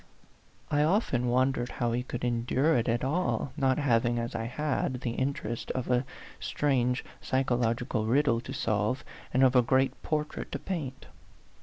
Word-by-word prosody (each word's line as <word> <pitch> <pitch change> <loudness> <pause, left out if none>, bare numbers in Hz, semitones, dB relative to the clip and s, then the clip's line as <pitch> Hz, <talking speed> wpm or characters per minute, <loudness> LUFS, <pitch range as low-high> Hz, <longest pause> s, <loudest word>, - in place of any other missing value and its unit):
I 145 -1 +3
often 150 - +2
wondered 125 0 +1
how 120 -2 0
he 120 +1 0
could 125 -1 -6
endure 125 +6 +2
it 120 -1 +1
at 120 +1 0
all, 150 -1 0
not 130 -2 +2
having, 120 -4 +2
as 115 0 -2
I 115 - -2
had, 130 0 -1
the 120 - -2
interest 120 -3 -3
of 130 -1 -2
a 125 +1 +2 0.3
strange 125 -3 0 0.2
psychological 120 -3 0
riddle 120 -1 +3
to 130 - -8
solve, 110 0 0 0.3
and 130 +2 +3
of 130 0 +5
a 125 - +7
great 130 +2 +1
portrait 150 -1 -3
to - - 0
paint. 145 -9 -5
125 Hz, 160 wpm, -29 LUFS, 120-135 Hz, 0.3 s, a